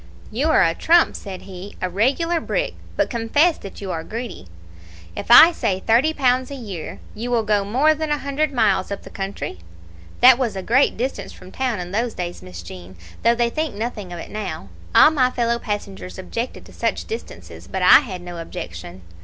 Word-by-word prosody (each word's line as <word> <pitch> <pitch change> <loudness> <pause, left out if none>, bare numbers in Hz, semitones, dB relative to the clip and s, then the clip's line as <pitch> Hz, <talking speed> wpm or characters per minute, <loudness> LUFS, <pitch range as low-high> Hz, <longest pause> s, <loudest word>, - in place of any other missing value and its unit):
"'You 270 +9 0
are - - +5
a 165 -1 +2
trump,' 335 - +3
said 190 -3 -8
he, 190 +1 -10
'a 185 - -1
regular 270 - +1
brick; - - -2 0.2
but - - +2
confess 280 +8 +2
that 195 - -10
you 195 -2 -4
are 160 -2 -4
greedy. 225 - -7 0.7
If - - -6
I 320 +8 +10
say 190 - -1
thirty 240 +10 +3
pounds 260 -4 +1
a 280 - -6
year, 200 - -7 0.2
you 230 +3 -5
will 235 -2 +1
go 210 -1 +1
more 260 +10 +3
than 310 0 -4
a 295 - +1
hundred 285 +2 -1
miles 215 -7 +1
up 200 - -5
the - - -12
country?' 195 - -5 0.6
That 255 0 +7
was 235 -6 -1
a 190 - -4
great 255 +7 +3
distance 225 -5 -4
from 185 - -14
town 250 -4 -2
in 180 0 -6
those 230 +3 -1
days, 175 -1 -5
Miss 90 -2 -9
Jean, 90 +1 -11 0.3
though 235 0 +4
they 235 0 +1
think 310 -6 -2
nothing 210 -4 -5
of 175 - -6
it - - -9
now. 190 - -5 0.3
All 305 - +8
my 260 -5 +3
fellow 235 -1 0
passengers 205 -4 -5
objected 230 +6 -5
to - - -15
such - - -2
distances, 450 - -8
but - - -3
I - - +9
had 190 -10 -7
no 175 -1 -7
objection. 90 - -8
225 Hz, 205 wpm, -21 LUFS, 185-260 Hz, 0.7 s, I